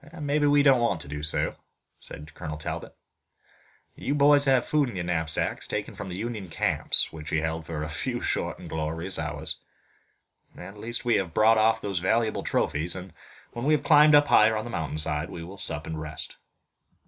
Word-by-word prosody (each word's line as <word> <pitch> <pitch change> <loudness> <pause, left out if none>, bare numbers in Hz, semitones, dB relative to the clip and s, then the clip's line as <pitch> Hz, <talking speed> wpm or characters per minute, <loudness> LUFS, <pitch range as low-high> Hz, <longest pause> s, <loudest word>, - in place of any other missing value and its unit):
"Maybe 145 0 +1
we 145 0 +5
don't 135 -3 +5
want 95 -8 0
to 70 - -7
do 75 +1 -5
so," 75 +1 -1 0.4
said 75 +1 -3
Colonel 75 -3 -6
Talbot. 75 - -5 1.0
"You 140 - -2
boys 145 0 +6
have 130 -3 +3
food 150 -4 +1
in 115 - -8
your 90 -1 -3
knapsacks, 80 -2 0
taken 105 +1 -3
from 100 -1 -7
the 90 - -5
Union 110 -3 -4
camps, - - +1
which 80 0 -8
we 80 - +1
held 80 0 -3
for 75 -2 -4
a - - -3
few 120 - -3
short - - -2
and - - -10
glorious 80 +4 -1
hours. - - -3 1.0
At 100 - -10
least 120 +3 -2
we 120 - +3
have 90 -5 -3
brought 110 +1 +5
off 110 +1 +3
those 100 -3 -2
valuable 110 +5 +1
trophies, 80 +4 -1
and, 90 -2 -8 0.4
when 120 +2 -4
we 155 +1 +4
have 145 - -3
climbed 150 -1 +7
higher 110 -7 +5
up 110 - -3
the 120 - -7
mountain 80 -2 -3
side, 75 +1 -1
we 85 - -7
will 95 +4 -10
sup 75 +1 -3
and 80 -1 -5
rest." 75 0 -6
95 Hz, 195 wpm, -26 LUFS, 80-120 Hz, 1.0 s, climbed